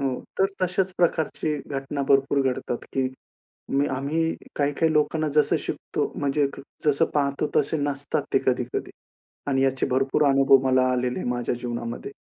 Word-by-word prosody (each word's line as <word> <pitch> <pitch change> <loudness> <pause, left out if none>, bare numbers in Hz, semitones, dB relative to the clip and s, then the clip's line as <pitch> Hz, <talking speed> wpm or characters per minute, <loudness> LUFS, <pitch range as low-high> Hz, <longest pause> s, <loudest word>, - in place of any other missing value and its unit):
हो. 135 - +1 0.3
तर 195 - +5 0.2
तशाच 185 +1 +1
प्रकारची 160 -2 +1
घटना 140 0 -3
भरपूर 140 0 +3
घडतात, 120 -1 -3
की 130 -1 +1 0.6
मी 140 +1 +2
आम्ही 160 +4 0 0.2
काही 145 0 +1
काही 160 +1 +2
लोकांना 155 +1 +1
जसं 150 - +4
शिकतो, - - -3
म्हणजे 145 0 +1 0.4
जसं 150 +2 +4
पाहतो 140 0 +1
तसे 160 - +2
नसतात 145 -1 -1
ते - - +5
कधी-कधी. - - -1 0.6
आणि 135 -1 +2
याचे 135 -1 +1
भरपूर 135 +3 +2
अनुभव 135 0 +6
मला 130 0 +4
आलेले 125 0 -1
माझ्या 120 0 -1
जीवनामध्ये. 120 +2 -5
140 Hz, 145 wpm, -25 LUFS, 135-150 Hz, 0.6 s, अनुभव